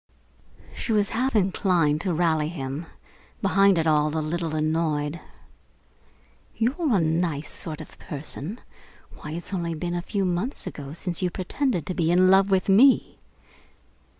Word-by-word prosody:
She -, -, -3 dB
was 205 Hz, -2 st, +2 dB
half 255 Hz, +2 st, -1 dB
inclined 180 Hz, -6 st, +2 dB
to 185 Hz, -, -1 dB
rally 160 Hz, -2 st, +1 dB
him, 150 Hz, 0 st, -5 dB, 0.5 s
behind 195 Hz, -1 st, +4 dB
it 165 Hz, -, +1 dB
all 150 Hz, 0 st, +2 dB
a -, -, +1 dB
little 160 Hz, +1 st, -2 dB
annoyed. 155 Hz, 0 st, 0 dB, 1.4 s
"You're 260 Hz, +3 st, +1 dB
a -, -, +3 dB
nice 160 Hz, -2 st, -1 dB
sort 155 Hz, -1 st, -4 dB
of 155 Hz, -, -13 dB
person! 150 Hz, -, -6 dB, 0.6 s
Why, 150 Hz, -, -7 dB
it's 175 Hz, +3 st, -4 dB
only 170 Hz, -3 st, -2 dB
a 175 Hz, 0 st, -2 dB
few 195 Hz, +2 st, -2 dB
months 185 Hz, +9 st, -2 dB
ago 140 Hz, -1 st, -7 dB
since 175 Hz, +1 st, -3 dB
you 180 Hz, -, +1 dB
pretended 185 Hz, -, -2 dB
to 185 Hz, -, -3 dB
be 165 Hz, -2 st, 0 dB
in 185 Hz, +2 st, +5 dB
love 195 Hz, +1 st, +5 dB
with 190 Hz, -1 st, +2 dB
me!" 240 Hz, +8 st, +4 dB
175 Hz, 150 wpm, -25 LUFS, 155-195 Hz, 1.4 s, in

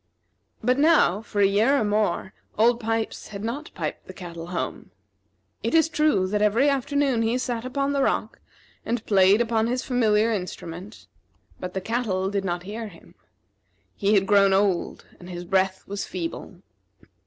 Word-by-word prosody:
But 250 Hz, +4 st, +2 dB
now, 290 Hz, -, +4 dB
for 210 Hz, -2 st, -2 dB
a -, -, +6 dB
year 215 Hz, +8 st, +3 dB
or -, -, +1 dB
more, 205 Hz, -3 st, 0 dB, 0.2 s
Old 235 Hz, +2 st, +4 dB
Pipes 225 Hz, -1 st, -2 dB
had 200 Hz, -1 st, -8 dB
not 270 Hz, +7 st, -4 dB
piped -, -, -5 dB
the -, -, -10 dB
cattle 170 Hz, -3 st, -8 dB
home. 180 Hz, -, -4 dB, 0.7 s
It -, -, -1 dB
is 320 Hz, 0 st, +5 dB
true 300 Hz, -12 st, +2 dB
that 205 Hz, +2 st, -1 dB
every 220 Hz, +7 st, +3 dB
afternoon 275 Hz, -2 st, +1 dB
he 230 Hz, +2 st, +1 dB
sat 245 Hz, -2 st, -3 dB
upon 275 Hz, +2 st, -1 dB
the 280 Hz, -, +1 dB
rock -, -, -1 dB, 0.4 s
and 230 Hz, -1 st, -2 dB
played 195 Hz, +1 st, +5 dB
upon 225 Hz, -1 st, +1 dB
his 250 Hz, +2 st, -1 dB
familiar 225 Hz, -3 st, +2 dB
instrument; 180 Hz, 0 st, -7 dB, 0.5 s
but 180 Hz, 0 st, -6 dB
the 190 Hz, -, -1 dB
cattle 195 Hz, -4 st, -1 dB
did 200 Hz, -1 st, -1 dB
not 175 Hz, -2 st, -2 dB
hear 215 Hz, +4 st, -6 dB
him. 170 Hz, -5 st, -16 dB, 0.8 s
He 205 Hz, +1 st, +2 dB
had 195 Hz, -1 st, +3 dB
grown 200 Hz, -1 st, +4 dB
old, 195 Hz, -2 st, 0 dB
and 175 Hz, -, -11 dB
his 175 Hz, -1 st, -6 dB
breath 190 Hz, +1 st, 0 dB
was 200 Hz, 0 st, -4 dB
feeble. 180 Hz, +1 st, -6 dB
210 Hz, 165 wpm, -25 LUFS, 190-240 Hz, 0.8 s, a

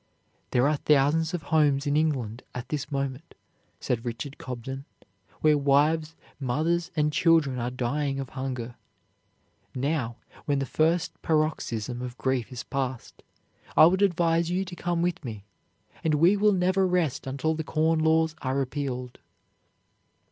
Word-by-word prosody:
"There 125 Hz, +3 st, +3 dB
are 150 Hz, 0 st, +2 dB
thousands 150 Hz, +4 st, +2 dB
of 165 Hz, -, -5 dB
homes 145 Hz, -3 st, +3 dB
in 145 Hz, 0 st, +1 dB
England 130 Hz, -7 st, 0 dB
at 125 Hz, +1 st, -6 dB
this 150 Hz, -1 st, -3 dB
moment," 140 Hz, +2 st, -4 dB, 0.4 s
said 115 Hz, -2 st, -2 dB
Richard 120 Hz, +4 st, -5 dB
Cobden, 130 Hz, +2 st, -6 dB, 0.6 s
"where 155 Hz, -1 st, +4 dB
wives, 155 Hz, +3 st, +2 dB, 0.2 s
mothers, 160 Hz, +7 st, 0 dB
and 150 Hz, -1 st, +1 dB
children 160 Hz, -6 st, +3 dB
are 120 Hz, +1 st, -1 dB
dying 135 Hz, +3 st, -1 dB
of 135 Hz, -2 st, -5 dB
hunger. 130 Hz, -3 st, -4 dB, 1.0 s
Now, 130 Hz, -3 st, -1 dB, 0.3 s
when 145 Hz, -1 st, +1 dB
the 135 Hz, -, -1 dB
first 160 Hz, +4 st, 0 dB
paroxysm 125 Hz, -7 st, -1 dB
of 125 Hz, -1 st, -6 dB
grief 130 Hz, -2 st, -1 dB
is 125 Hz, -1 st, -6 dB
passed, 130 Hz, -3 st, -4 dB, 0.6 s
I -, -, +10 dB
would 185 Hz, +4 st, +3 dB
advise 170 Hz, -3 st, +2 dB
you 185 Hz, +2 st, 0 dB
to 180 Hz, -1 st, -8 dB
come 175 Hz, -1 st, -1 dB
with 175 Hz, -2 st, -1 dB
me, 110 Hz, -6 st, -6 dB, 0.6 s
and 155 Hz, -2 st, +2 dB
we 170 Hz, +7 st, +5 dB
will 210 Hz, +1 st, +4 dB
never 185 Hz, 0 st, +2 dB
rest 165 Hz, -7 st, 0 dB
until 140 Hz, +4 st, 0 dB
the 160 Hz, 0 st, -3 dB
Corn 160 Hz, +1 st, +1 dB
Laws 160 Hz, 0 st, +3 dB
are 130 Hz, 0 st, -1 dB
repealed." 130 Hz, -2 st, -3 dB
145 Hz, 150 wpm, -27 LUFS, 130-160 Hz, 1.0 s, I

